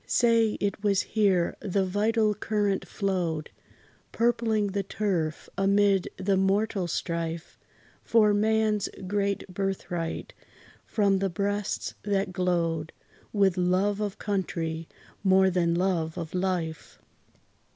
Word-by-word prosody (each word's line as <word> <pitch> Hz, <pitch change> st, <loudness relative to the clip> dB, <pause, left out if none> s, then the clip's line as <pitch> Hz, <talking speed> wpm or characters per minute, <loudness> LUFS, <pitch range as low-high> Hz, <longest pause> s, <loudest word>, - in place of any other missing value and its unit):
Say, 230 Hz, -2 st, +3 dB
it 200 Hz, 0 st, -2 dB
was 200 Hz, -2 st, +2 dB
here 195 Hz, -6 st, +1 dB
the 195 Hz, -1 st, 0 dB
vital 215 Hz, +3 st, +2 dB
current 205 Hz, -1 st, -1 dB
flowed, 175 Hz, -6 st, -2 dB, 0.6 s
Purpling 225 Hz, -3 st, +1 dB
the 200 Hz, +1 st, 0 dB
turf, 185 Hz, -5 st, -2 dB
amid 200 Hz, -1 st, +3 dB
the 190 Hz, +1 st, +1 dB
mortal 195 Hz, 0 st, +1 dB
strife 170 Hz, 0 st, -3 dB, 0.4 s
For 215 Hz, -2 st, +4 dB
man's 215 Hz, 0 st, +2 dB, 0.2 s
great 200 Hz, +1 st, -1 dB
birthright, 180 Hz, -3 st, -3 dB, 0.5 s
from 200 Hz, -3 st, +2 dB
the 195 Hz, 0 st, 0 dB
breasts, 205 Hz, +2 st, -2 dB
that 195 Hz, -2 st, -1 dB
glowed 170 Hz, -3 st, 0 dB, 0.4 s
With 195 Hz, -3 st, +2 dB
love 185 Hz, +3 st, +1 dB
of 205 Hz, -1 st, -3 dB
country, 165 Hz, -5 st, -2 dB, 0.4 s
more 190 Hz, -1 st, +5 dB
than 170 Hz, -2 st, +1 dB
love 170 Hz, -3 st, 0 dB
of 165 Hz, -2 st, -5 dB
life. 180 Hz, -4 st, -2 dB
195 Hz, 110 wpm, -27 LUFS, 180-205 Hz, 0.6 s, more